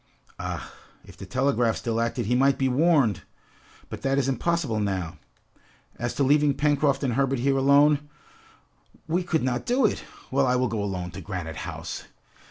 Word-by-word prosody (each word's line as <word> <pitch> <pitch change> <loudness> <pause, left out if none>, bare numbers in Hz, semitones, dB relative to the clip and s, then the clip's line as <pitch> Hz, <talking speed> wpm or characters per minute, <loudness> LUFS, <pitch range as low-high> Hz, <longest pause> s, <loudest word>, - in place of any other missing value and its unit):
"Ah, - - -5 0.3
if - - -14
the - - -10
telegraph 130 -3 +1
still 115 -1 -1
acted, 115 0 -1
he 120 - 0
might 135 +2 +3
be 135 - +1
warned! 135 - +3 0.7
But - - -8
that 135 0 0
is 135 -2 +1
impossible 135 -2 0
now! 95 -5 -3 0.8
As 120 0 -3
to 140 - +1
leaving 145 +1 +3
Pencroft 145 -1 +1
and 130 -3 0
Herbert 135 +1 +1
here 135 +3 +1
alone, 145 +2 +4 1.0
we 170 +3 +1
could 170 -4 -1
not 125 -1 -1
do 250 0 +3
it! 210 - 0 0.3
Well, 135 0 +2
I 125 - +2
will 125 -1 +1
go 110 -1 -2
alone 90 -3 -4
to - - -8
Granite 85 -5 -5
House." - - -6
135 Hz, 175 wpm, -25 LUFS, 115-145 Hz, 1.0 s, alone